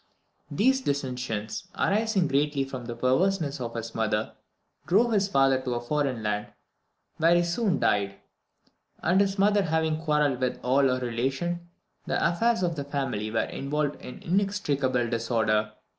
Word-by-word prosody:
These 255 - +2
dissensions, 125 - -3
arising 210 -3 +2
greatly 145 0 +1
from 130 -2 -7
the 120 0 -5
perverseness 145 +3 +1
of 115 -1 -5
his 115 0 -5
mother, 110 -1 -1 0.5
drove 220 +8 +3
his 200 -3 +2
father 135 -6 +3
to 125 -2 -2
a - - -1
foreign 130 -2 -1
land, 105 0 -1 0.7
where 165 +2 +4
he 175 - +4
soon 175 - 0
died; 100 -1 +1 0.9
and 180 +4 +4
his 195 0 0
mother 205 +1 +4
having 160 -2 0
quarrelled 150 -5 +1
with 125 - -1
all 135 +2 +3
her 130 -1 +1
relations, 135 +9 -1 0.5
the - - 0
affairs 225 +5 +1
of 170 -2 0
the 140 - -2
family 135 -7 -3
were 115 +1 +1
involved 145 +1 -2
in 125 - -10
inextricable 150 -10 0
disorder. 110 -2 0
140 Hz, 150 wpm, -27 LUFS, 120-175 Hz, 0.9 s, where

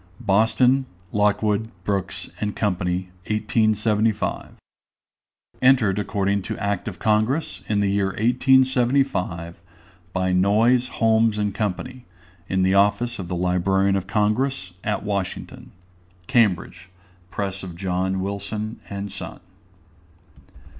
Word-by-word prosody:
BOSTON: 125 +5 +3 0.3
LOCKWOOD, 105 +1 +1
BROOKS, 95 -2 -3
& 105 0 -2
COMPANY. 90 -2 -1 0.2
1875. 110 0 0 1.1
Entered 120 -7 +4
according 100 -1 0
to - - -5
Act 100 -1 -2
of 95 -4 -5
Congress, 110 - 0
in 105 -1 +2
the 100 -1 +1
year 100 -1 +1
1875, 120 -6 +1 0.5
by 95 0 0
NOYES, 110 +7 +3
HOLMES, 110 -1 +3
AND 105 -1 -1
COMPANY, 120 +6 -4 0.4
In 95 0 +1
the 95 +1 +3
Office 105 +4 +2
of 90 - -5
the 90 - -3
Librarian 95 +2 +1
of 95 -1 -2
Congress, 105 0 0
at 105 -1 -1
Washington. 100 -3 -4 0.6
Cambridge: 95 -6 +1 0.4
_Press 100 -1 -3
of 90 -3 -7
John 95 +1 -1
Wilson 100 +3 -4
and 100 0 -5
Son. 100 - -8
100 Hz, 110 wpm, -23 LUFS, 95-110 Hz, 1.1 s, Entered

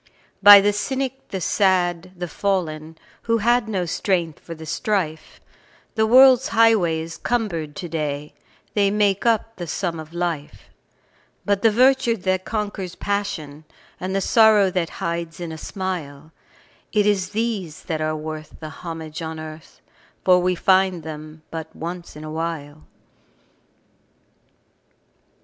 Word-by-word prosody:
By 205 0 +11
the 205 +1 +2
cynic, 265 +4 -3
the 190 - -4
sad, 185 -2 +1
the 175 0 -4
fallen, 160 -4 -2 0.3
Who 230 0 +2
had 235 +1 +2
no 190 -4 -1
strength 170 -2 -1
for 165 - -9
the 160 0 -10
strife, 170 -3 -2 0.5
The 220 -1 +2
world's 260 +2 +7
highway 220 -8 +3
is 165 +1 -7
cumbered 170 -11 -2
to 175 - -5
day 150 -2 -3 0.4
They 200 -2 +3
make 205 +1 +1
up 225 0 +1
the 175 -2 -5
sum 170 0 -3
of 155 0 -9
life; 170 -4 -4 0.7
But 200 -1 +1
the 225 - +5
virtue 250 +1 +3
that 185 -1 -1
conquers 205 -4 -4
passion, 170 -8 -3 0.4
And 190 +1 -3
the 195 - +1
sorrow 215 -2 +5
that 175 -2 -1 0.2
hides 170 0 -3
in 170 -2 -5
a 160 - -7
smile 160 -6 -5 0.6
It 210 -2 +2
is 195 -3 +1
these 210 -7 -3
that 160 -2 -3
are 155 0 0
worth 155 0 -7
the 155 - -7
homage 160 0 -7
on 160 -1 -5
earth, 155 0 -10 0.4
For 180 -1 +6
we 180 0 +1
find 185 -2 +2
them 155 0 -9
but 160 -1 -7
once 170 +1 -7
in 150 - -9
a 155 - -7
while. 155 -2 -5
180 Hz, 145 wpm, -22 LUFS, 160-205 Hz, 0.7 s, By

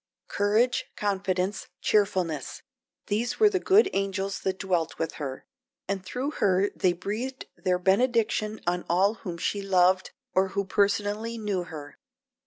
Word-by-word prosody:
Courage, 215 +5 +2
confidence, 195 -1 -1
cheerfulness 185 -8 0 0.4
these 225 +4 -1
were 425 -1 +6
the 380 - +1
good 410 +2 +5
angels 195 0 -1
that 190 0 -2
dwelt 175 -5 -1
with 165 - -2
her, 135 -2 -5 0.4
and 195 -1 -2
through 255 +9 -3
her 195 -5 +2
they 185 - +3
breathed 215 +9 -4
their 180 -1 0
benediction 215 +2 +1
on 175 0 0
all 190 +5 +3
whom 175 -5 -5
she 200 +4 -1
loved 185 -1 +3 0.2
or 190 +1 +3
who 200 - +1
personally 205 +3 0
knew 205 -5 -2
her. 150 -3 -9
195 Hz, 140 wpm, -27 LUFS, 185-215 Hz, 0.4 s, were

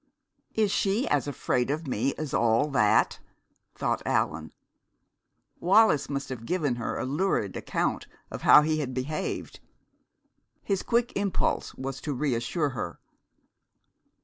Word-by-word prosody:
"Is 215 -3 +2
she 205 +6 +1
as 145 0 +1
afraid 125 -2 -1
of 155 +3 -2
me 130 +1 -1
as 155 -3 -5
all 120 +6 +2
that?" 105 -6 +3 0.6
thought - - -1
Allan. 80 +1 -1 1.1
Wallis 190 -5 +4
must 140 -1 -3
have 115 -3 -7
given 150 -9 0
her 115 - -3
a - - -2
lurid 140 - 0
account - - -2 0.2
of - - -6
how 150 - +8
he 155 0 0
had 130 -4 -3
behaved. 140 +4 -4 1.0
His 195 -2 0
quick 235 +1 0
impulse 200 -2 -1
was 135 0 -5
to 150 - -3
reassure 140 +3 0
her. 105 -10 -5
145 Hz, 130 wpm, -27 LUFS, 125-170 Hz, 1.1 s, how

